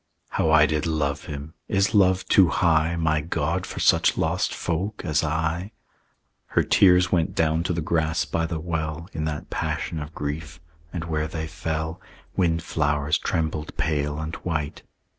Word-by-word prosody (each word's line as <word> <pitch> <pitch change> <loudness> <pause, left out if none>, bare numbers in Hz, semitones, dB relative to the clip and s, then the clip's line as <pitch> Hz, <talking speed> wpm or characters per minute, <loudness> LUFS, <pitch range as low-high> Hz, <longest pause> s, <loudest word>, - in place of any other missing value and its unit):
"How 80 - +1
I 80 -1 +7
did 75 +1 0
love 75 -2 -1
him! 75 +2 -7
Is 95 0 +1
love 95 -2 +4
too 95 -3 +6
high, 80 +1 +2
My 80 -2 +1
God, 80 - -1
for - - -6
such - - +4
lost - - 0
folk 95 +6 -3
as 80 -2 +1
I?" 80 +6 -1 0.7
Her - - +2
tears 90 -1 +5
went 85 -3 +1
down 80 0 +2
to - - 0
the 85 - -1
grass 80 0 0
by 80 0 -1
the 80 -2 -3
well, 80 -1 -3
In 80 -1 -2
that 75 -2 -4
passion 80 - -2
of 75 +1 -8
grief, 75 0 -4 0.3
and 85 -2 -4
where 80 -1 -1
they 80 0 -4
fell 80 +2 -4 0.3
Windflowers 75 -4 +1
trembled 80 -2 -2
pale 75 -1 0
and 80 +1 -4
white. 80 -4 -3
80 Hz, 160 wpm, -25 LUFS, 75-85 Hz, 0.7 s, I